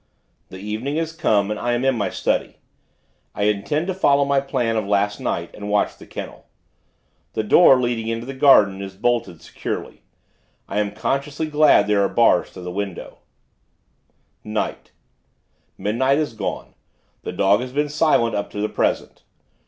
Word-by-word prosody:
The 95 - -9
evening 110 +8 -4
has 165 0 -2
come, 105 -10 +1
and 105 - -3
I 120 0 -1
am 120 +2 -1
in 135 - +3
my 105 - -1
study. - - -1 0.8
I 100 - -2
intend 105 +10 0
to 190 - -2
follow 140 -6 +3
my 140 0 +2
plan 120 -4 -1
of 110 -3 -1
last 105 0 +1
night, 85 0 -3
and 105 0 -7
watch 105 0 +1
the - - -15
kennel. - - -9 0.9
The 110 - -1
door, 135 +3 +6
leading 120 -2 -1
into 115 +1 -3
the 135 - -6
garden, 105 -8 +5
is 95 -1 -7
bolted, 100 -6 -1
securely. - - -6 0.7
I 100 - -2
am 105 0 -2
consciously 140 +6 -2
glad 155 0 +4
there 105 -1 +2
are 100 - +2
bars - - +3
to - - -10
the 90 0 -6
windows.... 100 -1 -5 1.3
Night: 105 0 -4 0.9
Midnight 130 +6 +1
has 150 -6 -1
gone. 110 - -5 0.5
The - - -5
dog 100 +3 +2
has 125 0 -6
been 145 +2 0
silent, 145 -6 +2
up 100 - -2
to 105 - -5
the 105 +1 -1
present. - - -2
115 Hz, 170 wpm, -21 LUFS, 100-140 Hz, 1.3 s, door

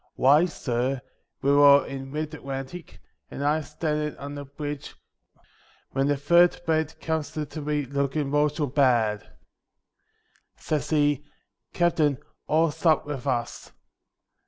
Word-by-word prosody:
Why, 145 +6 +5
sur, 130 -4 -2 0.4
we 140 - +3
war 140 0 +7
in 135 0 -7
mid 155 +1 -4
Atlantic, 135 +3 -7 0.3
and 140 - -6
I 150 +2 +2
stand 150 0 -2
in' 150 0 -4
on 140 +1 -7
the 145 0 -7
bridge, 145 +1 -6 1.0
when 135 +1 0
the 145 -1 +1
third 170 +5 +4
mate 160 -1 0
comes 160 -1 -3
up 150 -1 -4
to 155 - -6
me 150 -1 -1
lookin' 140 +1 -1
mortial 150 +1 +1
bad. 120 -6 +1 1.3
Says 155 -2 -2
he, 145 -2 +2 0.5
"Captain, 160 -5 +2 0.3
all's 160 0 +1
up 160 -3 +4
with 145 -2 -5
us." 120 -3 -3
145 Hz, 135 wpm, -26 LUFS, 135-155 Hz, 1.3 s, war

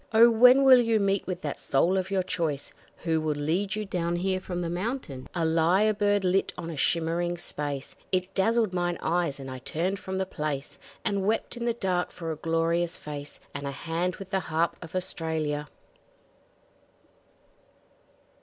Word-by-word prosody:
Oh! 230 +2 +8
when 250 +4 +7
will 260 -2 +8
you 230 -2 +2
meet 195 -1 +1
with 185 -1 -3
that 145 - -4
soul 170 +7 +2
of 190 -1 -1
your 195 -1 +1
choice, 160 -6 -2 0.3
Who 160 -2 +1
will 155 -1 0
lead 170 +8 0
you 215 0 -3
down 175 -3 -1
here 185 +2 0
from 180 -1 -4
the 170 - -2
mountains? 180 - -4
A 170 -2 +1
lyre 170 +7 +3
bird 205 -1 +2
lit 185 +1 +2
on 170 -1 -5
a - - -6
shimmering 170 +3 +1
space; 145 -4 -4 0.2
It 185 +1 0
dazzled 220 0 +2
mine 175 -1 0
eyes 165 -4 0
and 135 - -7
I 130 - -6
turned 175 +9 -2
from 190 0 -4
the 190 - 0
place, 150 -6 -4 0.3
And 200 -1 0
wept 225 +3 0
in 240 0 -4
the 235 -1 +1
dark 185 -5 0
for 165 -2 -5
a - - -3
glorious 165 +2 0
face, 145 -1 -7
And 145 0 -4
a - - -2
hand 165 +5 -2
with 195 -1 -10
the 190 - +2
Harp 165 -1 0
of 165 +1 -9
Australia! 160 -5 -2
175 Hz, 180 wpm, -27 LUFS, 160-195 Hz, 0.3 s, Oh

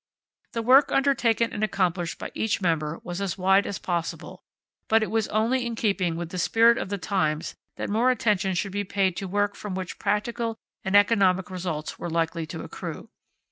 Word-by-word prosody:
The 230 -2 -2
work 265 +4 +6
undertaken 240 -5 +2
and 210 - -3
accomplished 180 -5 0
by - - -6
each 220 0 0
member 165 -4 -1
was 175 +2 -5
as 195 -2 -2
wide 190 +2 +3
as 200 - -3
possible; 170 -2 -4 0.5
but 225 0 +4
it - - -3
was 220 -1 +1
only 235 +4 +1
in 235 -1 -3
keeping 195 -6 0
with 170 0 -5
the 185 - -5
spirit 230 +6 +4
of 195 - -4
the 200 - -2
times 160 -6 -1 0.2
that - - -4
more 225 +5 +2
attention 205 -6 +1
should 195 +3 -1
be 205 +1 -2
paid 190 -2 0
to 195 - -4
work 205 +2 0
from 205 -3 -6
which 185 -1 -5
practical 225 +2 -1 0.3
and 190 +1 0
economic 195 -3 +4
results 175 -4 -4
were 175 - -4
likely 165 0 -1
to - - -6
accrue. - - -7
200 Hz, 190 wpm, -26 LUFS, 180-225 Hz, 0.5 s, work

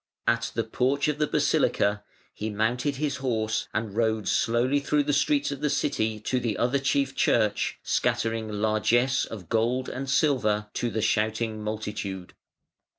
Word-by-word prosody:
At - - +1
the - - +1
porch 140 +3 0
of 150 0 -2
the 150 - +2
basilica 105 -5 +1 0.3
he 110 - -4
mounted 120 +6 0
his 140 0 -2
horse 110 -4 -1
and 110 -2 -3
rode 110 -3 0
slowly 120 +8 +2
through 145 +1 +1
the 145 +1 0
streets 280 - +2
of 140 -1 -6
the 150 - +1
city 110 -6 0
to 125 +3 0
the 115 -4 -2
other 125 +4 +1
chief 135 0 0
church, 110 -3 +1
scattering 115 -1 0
largesse 110 +5 +2
of 100 -6 -9
gold 120 +6 0
and 135 +1 -5
silver 115 -7 +1
to 120 - -1
the 110 0 -2
shouting 110 0 0
multitude. 105 -3 -5
115 Hz, 155 wpm, -26 LUFS, 110-135 Hz, 0.3 s, the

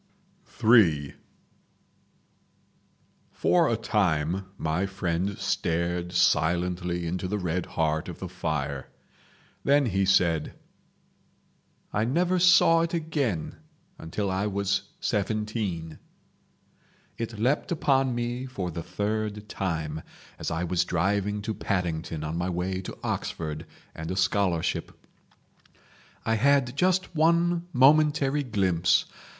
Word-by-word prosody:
III 85 - +5 2.2
For 170 -3 +3
a 115 - +1
time 95 -5 0
my 85 +5 -1
friend 95 0 -2
stared 85 +1 -1
silently 90 +1 +1
into 90 +2 -2
the 105 +3 -1
red 90 -2 -2
heart 80 +1 0
of 85 - -7
the 95 - -6
fire. 75 -6 -3 0.8
Then 140 0 +4
he 100 -4 +1
said: 85 -5 +2 1.4
"I 105 - +1
never 175 +8 +1
saw 170 -2 +6
it 170 +1 -1
again 145 - -2 0.4
until 95 +5 -3
I 95 +2 0
was 100 0 -1
seventeen. 105 -6 -2 1.2
"It 115 -1 -4
leapt 130 - 0
upon 135 -6 +2
me 120 +2 -3
for 95 -9 -4
the 85 - -5
third 105 +3 -3
time—as 80 -6 -5
I 80 +2 -2
was 90 0 +1
driving 100 +3 0
to 110 - -2
Paddington 85 -6 -2
on 80 +1 -3
my 90 +1 -1
way 95 +1 -2
to - - -8
Oxford 75 -1 -3 0.3
and 80 0 -6
a 95 - -2
scholarship. 90 -2 0 1.3
I 115 - +2
had 135 +1 +3
just 185 +2 +1
one 170 +2 +2
momentary 150 0 +4
glimpse. 95 -8 +2
100 Hz, 110 wpm, -27 LUFS, 85-120 Hz, 2.2 s, saw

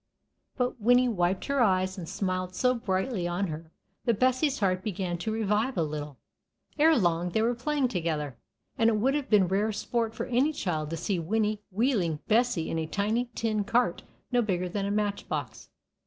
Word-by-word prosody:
But 250 -2 -1
Winnie 245 +3 +5
wiped 185 -4 0
her 280 -2 +1
eyes, 185 -3 +2
and 175 -5 -7
smiled 185 -1 -2
so 250 0 +3
brightly 190 -3 -1
on 175 +3 -1
her 160 +1 -7 0.3
that 230 -4 +1
Bessie's 255 +3 +2
heart 185 -3 +1
began 180 -4 -3
to 220 +5 -2
revive 220 +3 0
a 165 - +3
little. 150 -2 -5 0.6
Ere 315 0 +6
long 175 -3 +1
they 220 +5 0
were 235 +2 +2
playing 275 +3 0
together, 160 - -2 0.4
and 225 0 +5
it 225 - +2
would 260 +6 +2
have 285 -2 -2
been 205 -4 +5
rare 200 +4 +1
sport 230 +1 -2
for - - -3
any 260 +6 +2
child 155 - -2
to 165 - -3
see 185 +3 -1
Winnie 210 +4 0
wheeling 200 - +1
Bessie 225 -6 +2
in 165 - -1
a 160 - -2
tiny 215 +7 0
tin 215 -2 0
cart 230 -3 +1 0.3
no 245 -1 +3
bigger 185 -5 -1
than 200 +2 -2
a - - -1
match 205 -1 -1
box. - - -4
210 Hz, 190 wpm, -28 LUFS, 180-240 Hz, 0.6 s, Ere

